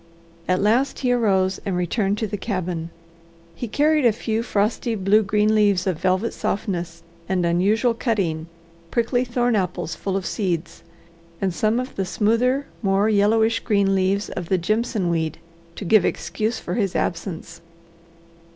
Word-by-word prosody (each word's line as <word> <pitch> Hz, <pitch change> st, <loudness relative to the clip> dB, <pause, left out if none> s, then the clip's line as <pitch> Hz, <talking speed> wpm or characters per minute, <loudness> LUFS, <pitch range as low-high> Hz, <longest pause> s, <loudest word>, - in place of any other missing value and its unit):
At 185 Hz, +1 st, +1 dB
last 240 Hz, +6 st, +2 dB
he 250 Hz, -2 st, +1 dB
arose 195 Hz, -6 st, +2 dB
and 190 Hz, -3 st, -2 dB
returned 195 Hz, +3 st, 0 dB
to 220 Hz, -, -1 dB
the 205 Hz, -, -4 dB
cabin. 180 Hz, -5 st, -3 dB, 0.6 s
He 235 Hz, +8 st, -5 dB
carried 300 Hz, +6 st, +2 dB
a 235 Hz, -, +6 dB
few 220 Hz, +1 st, -2 dB
frosty, 225 Hz, +1 st, 0 dB
blue 200 Hz, +2 st, +3 dB
green 210 Hz, +1 st, +2 dB
leaves 205 Hz, -4 st, +3 dB
of 185 Hz, -5 st, -1 dB
velvet 185 Hz, +5 st, +1 dB
softness 170 Hz, -4 st, -3 dB, 0.3 s
and 185 Hz, -2 st, +1 dB
unusual 205 Hz, +8 st, +2 dB
cutting, 190 Hz, -, -1 dB, 0.4 s
prickly 240 Hz, +3 st, +1 dB
thorn 245 Hz, -1 st, 0 dB
apples 180 Hz, -3 st, -2 dB
full 195 Hz, -1 st, -2 dB
of 190 Hz, -, -4 dB
seeds, 175 Hz, -6 st, -2 dB, 0.6 s
and 190 Hz, -2 st, 0 dB
some 215 Hz, +6 st, +1 dB
of 255 Hz, +1 st, -5 dB
the 195 Hz, -, 0 dB
smoother, 235 Hz, +8 st, +1 dB, 0.2 s
more 195 Hz, 0 st, +2 dB
yellowish 220 Hz, +2 st, +3 dB
green 200 Hz, -2 st, +1 dB
leaves 195 Hz, +2 st, +1 dB
of 175 Hz, -2 st, -6 dB
the 190 Hz, -, +3 dB
jimson 215 Hz, 0 st, 0 dB
weed, 160 Hz, -2 st, -1 dB, 0.4 s
to 205 Hz, -, -6 dB
give 205 Hz, +1 st, +5 dB
excuse 220 Hz, +4 st, -1 dB
for -, -, -5 dB
his 200 Hz, -5 st, -1 dB
absence. 170 Hz, -1 st, -3 dB
205 Hz, 155 wpm, -22 LUFS, 185-225 Hz, 0.6 s, a